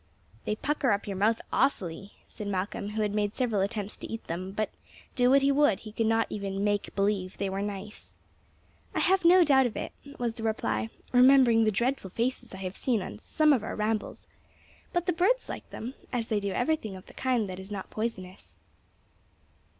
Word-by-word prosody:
"They 210 - 0
pucker 290 +1 0
up 200 - -2
your 200 - -4
mouth 215 +4 +2
awfully," 195 -6 0
said 210 -2 -7
Malcolm, 200 +1 -2
who 215 +1 -1
had 205 -1 -1
made 205 -1 0
several 230 -6 +1
attempts 205 0 -2
to - - -8
eat 225 - -5
them; 180 +3 -5
but, 215 +2 -2 0.4
do 245 0 +4
what 275 +1 +5
he 280 - +4
would, 280 -8 +3
he 215 - -9
could 225 +1 0
not 225 0 +3
even 195 -1 -3
"make 205 -1 0
believe" 195 -2 0
they 195 -1 -2
were 195 +1 -2
nice. 205 0 -6 0.8
"I - - +1
have 380 0 +3
no 355 +2 +7
doubt 265 -4 +5
of 230 - -7
it," - - -4 0.3
was 240 -2 -1
the 225 - -9
reply, 110 - -1 0.2
"remembering 250 -3 +6
the 215 - +3
dreadful 235 0 -1
faces 240 +7 -2
I 190 0 -6
have 185 +1 -4
seen 230 -7 0
on 105 - -8
some 305 - +3
of 245 -6 +1
our - - -4
rambles. 215 0 -2 0.7
But 350 0 0
the 360 - +1
birds 400 +9 +2
like - - -7
them, 240 +4 -6 0.2
as 240 -2 -2
they 215 -2 +2
do 200 -1 -2
everything 245 -4 -1
of 185 - -11
the - - -15
kind 250 -5 0
that 185 0 -6
is 190 +1 -9
not 200 -2 -6
poisonous." 195 -5 -5
215 Hz, 205 wpm, -28 LUFS, 195-250 Hz, 0.8 s, no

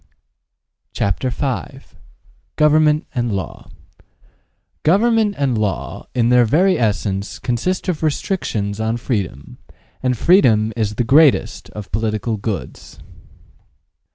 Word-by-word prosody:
CHAPTER 100 +6 -1
V 135 +1 -3 0.8
GOVERNMENT 150 0 +3
AND 120 -4 -1
LAW 95 -5 -6 1.1
GOVERNMENT 215 +4 +2
and 135 -4 0
Law, 105 -3 -3
in 120 -1 +2
their 125 0 +5
very 175 - +2
essence, 100 -3 -1
consist 135 - -2
of 175 -4 -2
restrictions 115 - -2
on 110 +1 -1
freedom, 100 - -4 0.4
and 125 -1 0
freedom 115 - +4
is 105 -2 -1
the 120 - 0
greatest 125 -7 +3
of 105 -2 -8
political 110 +2 -1
goods. 100 -2 -6
120 Hz, 105 wpm, -19 LUFS, 105-150 Hz, 1.1 s, their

